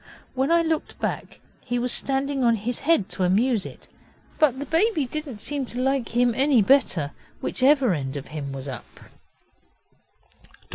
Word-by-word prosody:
When 265 +3 0
I 335 0 +4
looked 320 -1 -2
back - - -4 0.2
he 245 - -2
was 245 0 -1
standing 275 +1 0
on 235 -1 +4
his 230 +3 -3
head 285 - +2
to 185 - -2
amuse 210 +4 +2
it, - - -13 0.5
but 290 -5 +3
the 285 - -5
baby 330 -2 +1
did 305 +4 -4
not 225 -7 -8
seem 290 -2 -1
to 245 - -6
like 265 -3 -1
him 245 -1 +3
any 265 +1 +4
better 185 - +2 0.3
whichever 265 -4 +3
end 140 -3 -3
of 140 - -8
him 145 -3 -5
was 135 0 -6
up. 130 -5 -9
255 Hz, 165 wpm, -24 LUFS, 200-280 Hz, 0.5 s, I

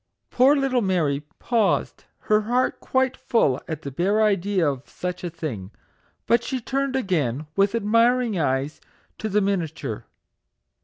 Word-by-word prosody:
Poor 265 +4 +5
little 270 -3 +1
Mary 165 -8 +1 0.2
paused, 230 -4 0 0.2
her 215 -1 +2
heart 245 +4 0
quite 260 0 0
full 140 - +1
at 160 0 -5
the 140 - -5
bare 190 +10 +1
idea 195 -4 +1
of 140 -2 -3
such 180 0 -5
a 175 - -2
thing; 145 - -6 0.6
but 235 +1 +3
she 260 0 -3
turned 270 +3 -2
again, 155 - -1
with 200 +2 +2
admiring 230 +1 +2
eyes, 135 0 -1 0.4
to 220 - -3
the 210 +1 +2
miniature. 165 - -3
200 Hz, 145 wpm, -24 LUFS, 155-235 Hz, 0.6 s, Poor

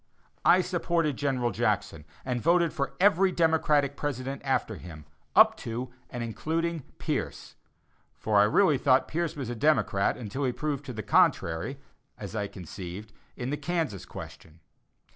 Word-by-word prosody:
I 185 - +6
supported 170 -4 0
General 130 -4 0
Jackson, 80 -4 -1 0.2
and 125 -2 -1
voted 170 +1 +3
for 140 - -3
every 195 -1 +4
Democratic 155 -4 +2
president 135 -2 -4
after 130 -6 -1
him, 80 -5 -11 0.3
up - - +7
to 120 +2 -5 0.2
and 120 -1 -4
including 165 +8 -2 0.2
Pierce; - - -3 0.6
for 105 -2 +2
I 105 - +6
really 150 - +3
thought 130 -1 +3
Pierce 170 +1 -2
was 130 -5 -4
a - - -4
Democrat 120 -7 +2
until 125 +4 -4
he 125 -2 +1
proved 145 -1 -3
the 110 -4 -5
contrary, 85 +8 +2 0.4
as 100 +1 -7
I 105 -2 -1
conceived, 95 +2 -8 0.2
in 125 +2 -3
the 145 - -1
Kansas 150 - -2
question. 80 +1 -10
135 Hz, 145 wpm, -28 LUFS, 110-155 Hz, 0.6 s, up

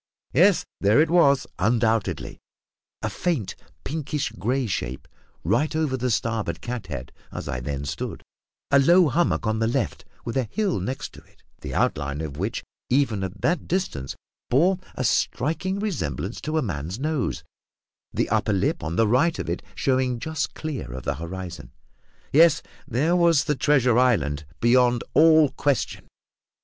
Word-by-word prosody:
Yes, 180 +7 +4
there 105 +7 +4
it 160 +1 +3
was, 140 -6 +4
undoubtedly; 115 0 0 0.6
a - - 0
faint, 160 - -2 0.3
pinkish 150 - -3
grey 125 +8 -1
shape, 90 - -4 0.4
right 155 +2 +1
over 155 -4 +1
the 125 0 -1
starboard 115 -1 -1
cat 120 -5 -5
head, 70 -6 -6 0.2
as - - -6
I 60 - -2
then 70 +2 -4
stood; - - -5 0.5
a 140 - +6
low 170 +4 +5
hummock 165 -2 +1
on 110 0 0
the 115 - +2
left, 115 - -1 0.2
with 115 - -3
a 130 - +1
hill 205 - 0
next 125 +9 -5
it, - - -19 0.2
the - - -6
outline 70 0 0
of 75 -3 -5
which, 100 +7 -3 0.3
even 120 -7 +2
at 95 +1 -6
that 175 - 0
distance, 115 - -2 0.3
bore 175 +9 +3 0.2
a 130 - -2
striking 160 - 0
resemblance 120 - -3
to 155 +1 -2
a 155 - +1
man's 85 - -4
nose, 140 - -2 0.7
the - - 0
upper - - +1
lip - - 0
on 80 +1 -3
the 115 +4 +3
right 145 +9 +3
of - - -3
it - - -3
showing 130 -2 +1
just 145 0 -3
clear 140 - -5
of 65 -1 -6
the - - -1
horizon. 90 +2 -7 0.6
Yes; 160 +1 +6 0.2
there 150 +9 +1
was 170 -4 +4
the 150 - 0
treasure 130 -4 +3
island, 75 - +1
beyond 120 0 +4
all 160 -2 +6
question! 140 -4 -1
125 Hz, 160 wpm, -24 LUFS, 95-155 Hz, 0.7 s, a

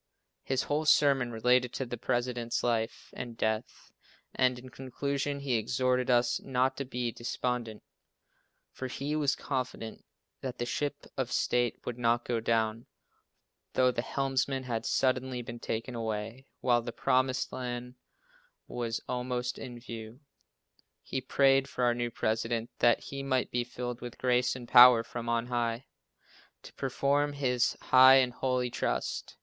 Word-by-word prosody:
His 130 -1 -1
whole 150 +2 -1
sermon 140 -4 +4
related 125 +2 +2
to 135 - -2
the 120 - -5
President's 120 0 -1
life 115 -1 -1
and 120 -2 -6
death, 110 +2 -3 0.4
and, 125 -1 +2
in 130 +1 -10
conclusion, 140 +3 -3
he 140 -2 -1
exhorted 125 +3 0
us 120 -1 +3
not 130 0 +1
to 140 - -3
be 125 -2 -2
despondent, 120 -1 -3 0.9
for 130 - -5
he 140 +4 -3
was 145 -3 +2
confident 125 -4 -4 0.4
that 130 -1 -5
the 120 - -2
ship 145 +3 -3
of 130 -2 -2
state 120 -1 0
would 125 0 -5
not 120 0 +2
go 120 -2 0
down, 115 0 0 0.9
though 130 0 +4
the 120 - -2
helmsman 135 0 -1
had 115 -3 -3
suddenly 130 -1 0
been 120 0 -8
taken 115 +3 -4
away 115 +3 -4
while 120 -1 +3
the 120 - -5
promised 130 +2 +1
land 125 -1 -5 0.7
was 120 -2 -3
almost 125 0 -2
in 120 -3 -8
view. 115 0 -9 0.8
He 130 - -3
prayed 135 +1 +3
for 125 - -3
our 120 -1 +4
new 120 0 -2
President, 115 +1 -1
that 120 -1 +4
he 140 0 -6
might 130 -2 0
be 120 0 0
filled 120 0 -6
with 120 -1 -7
grace 125 0 +2
and 125 -2 -8
power 120 -2 +9
from 115 0 -6
on 115 0 +1
High, 120 0 -2 0.8
to - - -12
perform 140 +2 0
his 125 -3 +1
high 130 +1 +8
and 130 -2 +3
holy 125 -1 -1
trust. - - -2
125 Hz, 150 wpm, -30 LUFS, 120-130 Hz, 0.9 s, power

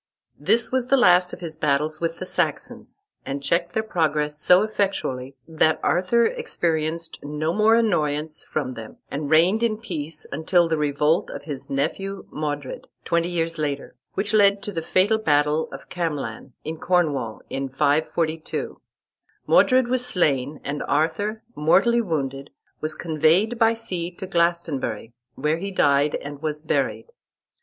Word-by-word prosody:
This 235 +1 +3
was 255 -1 0
the 275 - +4
last 180 -6 +5
of - - -9
his 165 -2 -5
battles 155 +1 0
with 165 0 -1
the 185 - -5
Saxons, 405 - -3 0.2
and 140 +1 -5
checked 170 +4 0
their 220 - 0
progress 150 -6 -1
so 180 +2 +5
effectually, 190 -12 -2
that 160 -1 +2
Arthur 185 +7 +3
experienced 165 - -2
no 150 +3 -2
more 215 +2 +4
annoyance 155 -8 0
from 140 -4 -3
them, 115 -2 -10
and 145 0 -3
reigned 175 +8 +4
in 225 -2 +1
peace, 160 -8 -6
until 170 +3 +2
the 165 - +1
revolt 150 +2 +1
of - - -7
his 145 -3 -7
nephew 190 +8 -2
Modred, 145 -3 -4 0.2
twenty 170 0 +1
years 165 -2 -2
later, 145 -2 -3 0.2
which 205 +2 -1
led 200 -1 +4
to 205 - -4
the 165 -4 -3
fatal 195 +6 +2
battle 150 -3 +2
of 135 - -10
Camlan, 145 -8 -4
in 160 +1 -5
Cornwall, 155 -11 0
in 135 0 -3
542. 155 +3 -1 0.6
Modred 255 -1 +4
was 250 0 +2
slain, 150 - 0
and 145 +1 -3
Arthur, 165 +9 0
mortally 200 +10 +3
wounded, 140 - -3 0.3
was 155 0 -2
conveyed 170 +8 +2
by 225 0 +4
sea 185 -7 -4
to 180 +2 -8
Glastonbury, 170 - -1 0.2
where 150 +3 0
he 200 +3 -3
died, 145 -5 +2
and 145 0 -7
was 155 -1 -2
buried. 155 - -1
160 Hz, 150 wpm, -23 LUFS, 150-195 Hz, 0.6 s, last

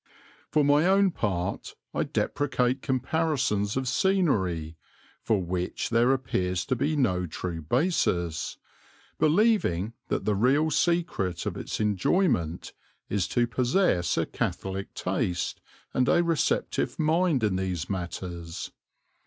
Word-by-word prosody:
For 150 - +3
my 145 +4 +4
own 195 0 +4
part 95 - -3 0.2
I - - 0
deprecate 130 -2 0
comparisons 130 -6 0
of 130 -1 -1
scenery, 100 - +1 0.5
for 105 -5 +1
which 90 +4 -3
there 120 +2 +4
appears 95 -9 -1
to 130 - 0
be 145 +5 0
no 90 -11 +1
true 85 +1 -5
basis, 85 - 0 0.6
believing 155 - +2
that - - -2
the 105 - +2
real 135 +9 +3
secret 160 - 0
of - - -2
its - - -5
enjoyment 105 - +1 0.4
is 100 -3 0
to 120 - +2
possess 120 - +1
a - - +2
catholic 95 0 -4
taste 90 -1 -2 0.3
and 130 0 +2
a 175 - +4
receptive 165 -2 0
mind 160 -3 +2
in 105 -3 +2
these 95 -3 -2
matters. 85 -2 -5
115 Hz, 120 wpm, -27 LUFS, 90-150 Hz, 0.6 s, my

